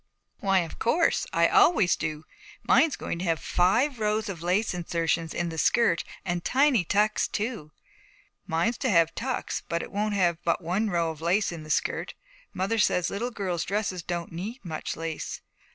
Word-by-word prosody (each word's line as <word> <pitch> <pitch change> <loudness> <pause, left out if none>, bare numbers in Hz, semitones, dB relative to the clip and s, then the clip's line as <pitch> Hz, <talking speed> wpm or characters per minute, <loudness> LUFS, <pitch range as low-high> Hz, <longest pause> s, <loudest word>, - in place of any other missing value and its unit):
'Why, 195 -2 +3
of 165 - -7
course. 330 +8 +2
I - - +4
always 350 - +4
do. 155 0 -4 0.4
Mine's 320 -4 +4
going 170 - -4
to 185 - -3
have 165 -2 +1
five 230 +9 +2
rows 215 0 0
of 175 -5 -6
lace 185 +6 +1
insertion 165 -1 -1
in 175 -1 -2
the 160 -1 -5
skirt 180 -5 +3 0.2
and 175 -2 -2
tiny 265 -6 +3
tucks 210 +4 +1
too.' 210 -8 -4 0.8
'Mine's 180 +7 0
to 260 - 0
have 165 -4 +4
tucks, 255 +2 -3
but 170 0 -1
it - - -9
won't 210 +1 -1
have 175 -3 +1
but 170 - +1
one 190 +6 0
row 170 -3 0
of 160 -1 -11
lace 180 +5 +1
in 170 -2 -7
the 155 - -11
skirt. - - -1 0.4
Mother 195 +5 -1
says 180 -3 +2
little 230 +5 -2
girls' 185 -7 -2
dresses 195 -2 -2
don't 170 0 -4
need 200 +7 -6
much 160 -2 -4
lace.' 165 -1 -5
180 Hz, 180 wpm, -27 LUFS, 170-215 Hz, 0.8 s, I